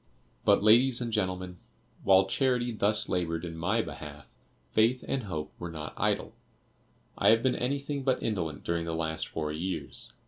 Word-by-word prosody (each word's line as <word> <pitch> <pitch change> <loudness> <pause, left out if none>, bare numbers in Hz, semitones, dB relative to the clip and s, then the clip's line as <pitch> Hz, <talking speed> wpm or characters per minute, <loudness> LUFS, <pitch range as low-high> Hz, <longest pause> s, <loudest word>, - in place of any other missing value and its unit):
"But, - - +4
ladies 120 +4 +6
and 120 -2 -3
gentlemen, 95 -3 -2 0.4
while 95 0 +6
Charity 125 +3 +1
thus 105 0 +2
labored 85 -2 -1
in 85 -1 -6
my 100 +8 0
behalf, 75 -2 -9 0.5
Faith 115 +4 +2
and 130 -4 -2
Hope 80 -6 -5
were 85 - -5
not 80 -2 -7
idle. - - 0 0.9
I - - +5
have 115 +1 +5
been 130 - +3
anything 140 +2 -2
but 130 -1 0
indolent 85 -9 -2
during 85 -1 -1
the 85 -1 -3
last 80 -1 -2
four 75 -1 -3
years. 90 +5 -4
95 Hz, 165 wpm, -29 LUFS, 80-120 Hz, 0.9 s, ladies